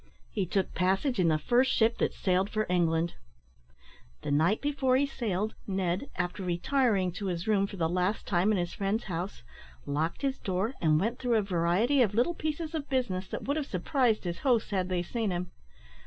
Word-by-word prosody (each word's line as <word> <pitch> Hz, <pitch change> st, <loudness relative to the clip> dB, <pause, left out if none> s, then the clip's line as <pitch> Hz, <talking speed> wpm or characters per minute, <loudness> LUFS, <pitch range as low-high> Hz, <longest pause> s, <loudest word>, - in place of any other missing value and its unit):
He 195 Hz, -3 st, -1 dB
took 190 Hz, +1 st, -1 dB
passage 195 Hz, +7 st, +1 dB
in 180 Hz, -, +4 dB
the 155 Hz, -1 st, +3 dB
first 245 Hz, -, +2 dB
ship 225 Hz, +1 st, +2 dB
that -, -, +2 dB
sailed 190 Hz, +1 st, +1 dB
for 215 Hz, 0 st, -1 dB
England. 170 Hz, -1 st, +1 dB, 1.1 s
The -, -, -2 dB
night 160 Hz, +9 st, +3 dB
before 275 Hz, -3 st, +1 dB
he 280 Hz, -, +3 dB
sailed, 215 Hz, -6 st, -2 dB
Ned, 190 Hz, +4 st, -1 dB
after 180 Hz, +2 st, -2 dB
retiring 190 Hz, +2 st, +1 dB
to 195 Hz, +3 st, -5 dB
his 175 Hz, 0 st, -3 dB
room 200 Hz, -2 st, +3 dB
for 200 Hz, -, -9 dB
the 165 Hz, -2 st, +1 dB
last 180 Hz, +5 st, 0 dB
time 185 Hz, +2 st, +2 dB
in 210 Hz, -, +2 dB
his 175 Hz, -1 st, -2 dB
friend's 200 Hz, +3 st, -1 dB
house, 180 Hz, -, -5 dB, 0.4 s
locked 155 Hz, -, -2 dB
his 275 Hz, -1 st, 0 dB
door, 195 Hz, +6 st, -1 dB
and 155 Hz, -2 st, +4 dB
went 225 Hz, +7 st, -1 dB
through 245 Hz, -2 st, +1 dB
a 215 Hz, -, +2 dB
variety 195 Hz, +9 st, +2 dB
of 210 Hz, -4 st, +2 dB
little 245 Hz, +9 st, +2 dB
pieces 315 Hz, 0 st, -3 dB
of 305 Hz, -3 st, -4 dB
business 225 Hz, -9 st, -1 dB
that -, -, -5 dB
would 285 Hz, +3 st, -1 dB
have 295 Hz, -3 st, -2 dB
surprised 225 Hz, -, +1 dB
his 175 Hz, -2 st, -4 dB
hosts 245 Hz, -7 st, +1 dB
had 185 Hz, -2 st, 0 dB
they 180 Hz, -1 st, 0 dB
seen 225 Hz, +3 st, -2 dB
him. 180 Hz, 0 st, -3 dB
195 Hz, 200 wpm, -29 LUFS, 180-245 Hz, 1.1 s, in